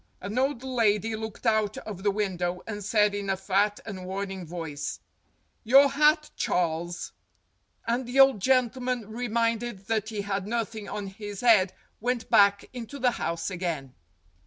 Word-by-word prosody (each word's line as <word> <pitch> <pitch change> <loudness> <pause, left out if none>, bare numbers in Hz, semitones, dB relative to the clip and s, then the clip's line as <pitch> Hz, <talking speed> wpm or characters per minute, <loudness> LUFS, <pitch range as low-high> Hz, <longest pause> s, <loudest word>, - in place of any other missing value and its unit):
An 200 +6 -3
old 265 -1 0
lady 225 -4 +1
looked 220 -1 -7
out 215 -2 +2
of 200 -4 -7
the 205 - +2
window 180 -3 -2
and 210 -2 -5
said 210 0 +3
in 200 -1 -3
a 195 - +1
fat 200 +2 +1
and 195 -4 -6
warning 190 -2 -4
voice, 160 -4 -5 0.6
"Your 275 +5 +7
hat, 300 +2 +3
Charles." 175 0 -1 0.7
And 235 +2 -1
the 255 +3 0
old 270 -5 +7
gentleman, 250 0 +1
reminded 230 -2 -1
that 220 -1 0
he 215 -2 -3
had 200 -1 -3
nothing 220 -2 -3
on 205 - -4
his 200 +1 -7
head, 215 -6 +5 0.3
went 245 +1 -2
back 200 -2 +5
into 245 +3 -7
the 250 -2 +2
house 170 -3 -3
again. 165 -8 -3
210 Hz, 155 wpm, -27 LUFS, 195-235 Hz, 0.7 s, Your